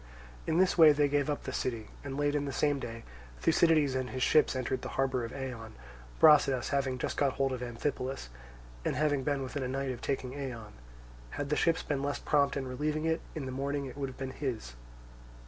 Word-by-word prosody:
In 160 - +1
this 185 -1 +3
way 155 -2 +9
they 145 0 +3
gave 145 0 +1
up 145 - -2
the 130 - -5
city, 115 -4 -3
and 140 -1 -5
late 145 0 +1
in 145 -1 0
the 140 - -3
same 145 +2 +1
day 115 -2 -6 0.4
Thucydides 155 - +4
and 130 -1 -2
his 130 -1 -2
ships 155 -1 +4
entered 130 0 -2
the - - -5
harbour 130 -2 +1
of 115 - -5
Eion, 125 -5 -6 0.5
Brasidas 140 -5 +5
having 135 -2 0
just - - -3
got 140 -2 +2
hold 135 0 0
of 125 - -4
Amphipolis, 125 - -3 0.5
and - - -1
having 145 0 +1
been 140 -1 0
within 135 +2 -4
a 130 - -1
night 135 +1 -2
of 120 - -7
taking 130 -2 -2
Eion: 130 -6 -6 0.6
had 140 - -4
the - - +3
ships 165 +1 +2
been 140 -2 -2
less 145 0 -1
prompt 140 -1 +2
in 135 -1 -3
relieving 150 +4 -2
it, 160 0 +1
in 150 -4 -4
the 130 - -4
morning 140 +2 -2
it 130 - -8
would 140 -1 -3
have 130 - -12
been 135 -1 -4
his. 125 - -4
135 Hz, 215 wpm, -31 LUFS, 130-145 Hz, 0.6 s, way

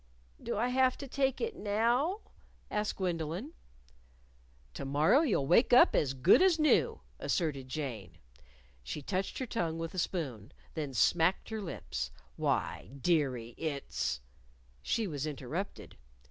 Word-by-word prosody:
"Do - - -3
I 240 +3 +1
have 255 0 +3
to 275 - -7
take 270 0 0
it 460 -3 -2
now?" 240 - +1 0.5
asked 210 0 -1
Gwendolyn. 175 - -3 1.2
"To - - -6
morrow 150 - +4
you'll 225 - +1
wake 230 - +4
up 250 - +7
as 135 -2 +1
good 130 - +6
as 370 -3 +5
new," 305 -1 +3 0.2
asserted 140 -7 -1
Jane. 125 - -5 0.6
She 65 - -6
touched 190 +5 -2
her 260 - -2
tongue 170 -9 -2
with 165 0 -4
the 185 - -4
spoon, 135 - -3 0.2
then 145 -5 -4
smacked 165 - +3
her 220 -1 -3
lips. 65 - -4 0.3
"Why, - - -1
dearie, 130 -8 +1
it's 140 - -2 0.3
" - - -32
She 230 - 0
was 150 -5 -3
interrupted. 150 +6 -5
165 Hz, 140 wpm, -32 LUFS, -, 1.2 s, up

